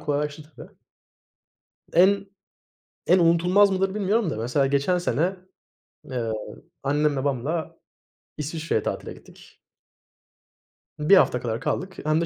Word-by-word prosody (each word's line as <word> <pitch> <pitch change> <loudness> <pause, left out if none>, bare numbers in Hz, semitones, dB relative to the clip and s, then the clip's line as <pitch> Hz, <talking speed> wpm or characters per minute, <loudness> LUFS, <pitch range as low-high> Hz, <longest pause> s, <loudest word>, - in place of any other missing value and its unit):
kolaylaştı 150 0 -2
tabii. - - -11 1.2
En 200 +3 +4 0.8
en 185 - +5
unutulmaz 180 +4 +4
mıdır 190 +1 0
bilmiyorum 210 -1 +1
da 140 - -4
mesela 125 +5 +1
geçen 140 +6 +1
sene, 175 +3 0 0.7
eee, 120 -4 -2 0.5
annem 145 +1 +1
babamla 140 +4 -2 0.6
İsviçre'ye 155 -5 -2
tatile - - -4
gittik. - - -18 1.4
1 155 +6 +6
hafta 125 - +3
kadar 115 -1 -3
kaldık. 185 0 -3
Hem 155 +1 +2
de - - 0
155 Hz, 115 wpm, -24 LUFS, 140-185 Hz, 1.4 s, 1